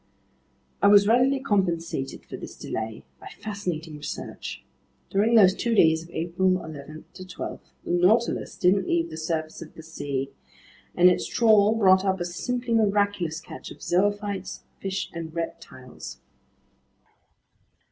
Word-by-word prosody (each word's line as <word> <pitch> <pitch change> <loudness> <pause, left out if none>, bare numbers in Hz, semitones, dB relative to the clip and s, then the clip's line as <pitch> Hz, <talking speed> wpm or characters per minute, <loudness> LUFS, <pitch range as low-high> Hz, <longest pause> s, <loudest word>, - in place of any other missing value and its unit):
I - - +5
was 200 0 +7
readily 255 +4 +4
compensated 170 - -1
for - - -8
this - - -9
delay 110 0 -5 0.2
by - - -11
fascinating 175 -7 -4
research. 150 +1 -7 0.5
During 215 +4 +3
those 190 -4 +7
two 230 +3 -1
days 160 -4 +5
of 165 - -13
April 175 +3 0 0.2
11 155 0 -9
12, 185 0 -7 0.3
the - - -3
Nautilus 190 +7 +2
didn't 185 +1 +3
leave 170 0 0
the - - -6
surface 160 -1 -3
of 155 - -10
the 160 - -11
sea, 140 -4 -4 0.6
and 175 - +6
its 180 - +2
trawl 220 -2 +4
brought 190 -3 +5
up 190 -1 0
a 175 - -2
simply 240 +7 -3
miraculous 200 -6 +1
catch - - -10
of - - -12
zoophytes, 200 +1 -1 0.2
fish, 195 0 -3
and 165 -1 -7
reptiles. 130 -6 -7
185 Hz, 135 wpm, -25 LUFS, 160-205 Hz, 0.6 s, was